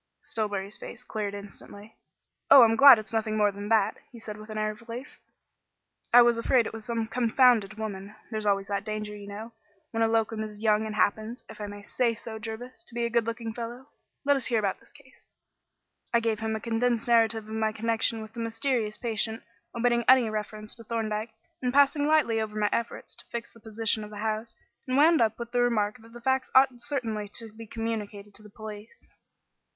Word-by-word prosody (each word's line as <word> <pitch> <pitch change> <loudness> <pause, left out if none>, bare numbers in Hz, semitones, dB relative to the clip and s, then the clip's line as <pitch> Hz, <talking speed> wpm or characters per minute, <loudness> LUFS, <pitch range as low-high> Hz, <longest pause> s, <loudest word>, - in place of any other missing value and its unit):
Stillbury's 205 -2 -3
face 240 - -9
cleared 210 -4 -4
instantly. 205 +1 -11 0.5
"Oh, 270 - +10
I'm 225 -1 +4
glad 275 -1 +10
it's 215 +1 -8
nothing 220 -1 0
more 210 -1 +3
than 205 +1 -7
that," 220 -2 +3
he 240 - -12
said 220 -2 -7
with 215 +1 -12
an 215 - -5
air 215 0 0
of 215 +2 -13
relief. 245 +5 -8 0.9
"I 245 0 +9
was 235 -1 +3
afraid, 240 0 +3
it - - -5
was 225 -1 -7
some 230 -1 -1
confounded 230 -3 +3
woman. 210 -2 -6 0.2
There's 215 -1 -2
always 195 -1 +1
that 200 -1 -1
danger, 210 0 -4
you 205 -1 -10
know, 215 +3 -7 0.4
when 225 - -2
a 225 - +4
locum 225 -1 0
is 210 0 -9
young 215 0 +3
and 215 - -5
happens 215 +4 0
if - - -11
I 205 - -3
may 205 0 -9
say 235 +2 0
so, 220 0 -8
Jervis 225 +2 -7
to 235 - -12
be 235 0 0
a 235 - -2
good 235 -1 +1
looking 230 -1 -4
fellow. 240 +4 -7 0.4
Let 285 0 +5
us 265 -3 -2
hear 235 - +1
about 200 -3 0
this - - -19
case." 280 -3 -20 0.8
I 235 - +4
gave 225 -2 -1
him 220 0 -2
a - - -3
condensed 235 +1 0
narrative 225 -2 +3
of 220 - -7
my 220 0 0
connection 225 0 0
with 220 0 -12
the 235 - -8
mysterious 230 -1 -1
patient, 225 -1 -2 0.3
omitting 235 0 +2
any 250 -4 +6
reference 215 0 -5
to 230 - -11
Thorndyke, 220 0 -3 0.3
and 250 -1 0
passing 285 +2 +4
lightly 290 -8 +3
over 215 -1 -4
my 210 -1 +2
efforts 235 0 -3
to - - -11
fix 235 0 -5
the 230 - -17
position 220 0 0
of 210 - -8
the 210 - -9
house, 220 +1 -3 0.3
and 255 +1 +1
wound 315 +1 +6
up 220 -1 +2
with 235 0 -7
the 245 0 +2
remark 225 -2 +1
that 225 +1 -17
the 240 - -11
facts 265 +1 +1
ought 260 -2 +5
certainly 225 -6 -2
to 225 -2 -5
be 225 0 -10
communicated 210 -2 -5
to - - -7
the 210 - -14
police. 215 - -10
225 Hz, 215 wpm, -27 LUFS, 215-235 Hz, 0.9 s, Oh